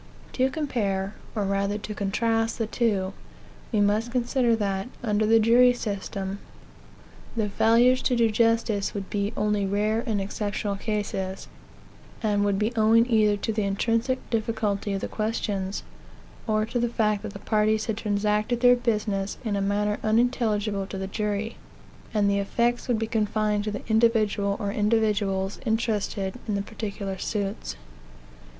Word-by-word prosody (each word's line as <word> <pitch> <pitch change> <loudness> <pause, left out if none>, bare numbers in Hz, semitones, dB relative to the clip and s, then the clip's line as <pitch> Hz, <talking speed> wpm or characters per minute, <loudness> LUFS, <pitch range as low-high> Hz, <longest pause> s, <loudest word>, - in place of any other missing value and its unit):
To 260 0 +2
compare, 210 -10 -1 0.2
or 210 -2 0
rather 200 +1 0
to 210 0 -6
contrast, 225 +3 0
the 225 - 0
two, 205 -4 0 0.6
we 215 - +1
must 210 +3 +1
consider 245 -1 +2
that, 200 0 -2
under 210 -2 +1
the 225 +1 +6
jury 240 +3 +6
system, 200 -3 -4 1.0
the 215 -2 +1
failures 235 +5 +4
to 250 - +1
do 230 -2 +3
justice 225 -2 +1
would 195 -1 -5
be 205 0 -1
only 210 -1 +1
rare 210 +3 +1
and 215 -3 0
exceptional 205 +1 -2
cases; 195 -2 -3 0.8
and 205 -2 +2
would 200 -1 +1
be 215 +4 0
owing 225 +1 +5
either 210 -2 +4
to 220 +2 -2
the 215 - 0
intrinsic 230 +6 0
difficulty 215 -3 -1
of 195 - -2
the - - -2
questions, 205 -3 -2 0.6
or 215 -1 +2
to 240 +2 -2
the 240 0 +1
fact 215 -3 +1
that - - -6
the - - -6
parties 215 +1 +1
had. 220 - -1
transacted 210 +2 0
their 245 0 +7
business 210 -5 -1
in 210 -2 0
a 200 - 0
manner 205 +1 0
unintelligible 215 -3 +1
to 195 - -6
the 190 - -3
jury, 210 +2 -2 0.5
and 210 -2 +2
the 200 0 +2
effects 235 +4 0
would 245 -3 +2
be 225 - -1
confined 215 -1 0
to - - -1
the 205 -1 -6
individual 220 -3 +2
or 200 -1 -2
individuals 205 -2 +1
interested 220 -3 -1
in 210 - 0
the 200 - -1
particular 200 -3 -5
suits. 200 0 -3
210 Hz, 155 wpm, -26 LUFS, 200-225 Hz, 1.0 s, their